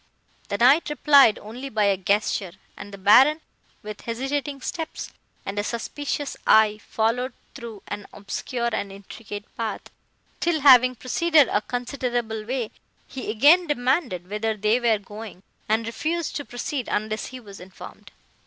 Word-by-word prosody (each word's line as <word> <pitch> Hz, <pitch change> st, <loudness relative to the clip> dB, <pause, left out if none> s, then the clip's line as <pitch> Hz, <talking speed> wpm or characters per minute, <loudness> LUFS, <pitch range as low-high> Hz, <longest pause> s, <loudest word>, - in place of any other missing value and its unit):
The 200 Hz, -, -1 dB
Knight 270 Hz, +9 st, +5 dB
replied 285 Hz, -6 st, +5 dB
only 245 Hz, +6 st, -8 dB
by 215 Hz, -4 st, 0 dB
a 200 Hz, -1 st, +3 dB
gesture, 195 Hz, -1 st, 0 dB, 0.2 s
and 205 Hz, -, -10 dB
the 200 Hz, -, -9 dB
Baron, 260 Hz, +11 st, +6 dB, 0.4 s
with 210 Hz, 0 st, -8 dB
hesitating 270 Hz, +4 st, -3 dB
steps 325 Hz, +4 st, -5 dB, 0.3 s
and 200 Hz, +1 st, -3 dB
a -, -, 0 dB
suspicious 285 Hz, +6 st, -4 dB
eye, 215 Hz, -1 st, +5 dB
followed 240 Hz, +3 st, 0 dB, 0.2 s
through 225 Hz, -4 st, -9 dB
an 205 Hz, -1 st, -6 dB
obscure 235 Hz, +4 st, -3 dB
and 200 Hz, -2 st, -3 dB
intricate 205 Hz, +1 st, -9 dB
path, 225 Hz, -2 st, -4 dB, 0.5 s
till, 335 Hz, -3 st, 0 dB
having 255 Hz, -2 st, +7 dB
proceeded 300 Hz, +4 st, +3 dB
a 205 Hz, -, +1 dB
considerable 245 Hz, -2 st, -3 dB
way, 245 Hz, -2 st, -3 dB, 0.4 s
he 260 Hz, -, -7 dB
again 295 Hz, +11 st, +5 dB
demanded 250 Hz, -, 0 dB
whither 215 Hz, +2 st, -2 dB
they 215 Hz, +4 st, +2 dB
were 235 Hz, -3 st, +2 dB
going, 205 Hz, -1 st, -10 dB, 0.3 s
and 220 Hz, +1 st, +1 dB
refused 315 Hz, +8 st, -3 dB
to 285 Hz, -, -6 dB
proceed 245 Hz, +1 st, -4 dB
unless 215 Hz, +1 st, -2 dB
he 260 Hz, -, -9 dB
was 200 Hz, -5 st, -12 dB
informed. 185 Hz, +1 st, -12 dB
230 Hz, 145 wpm, -24 LUFS, 210-270 Hz, 0.5 s, having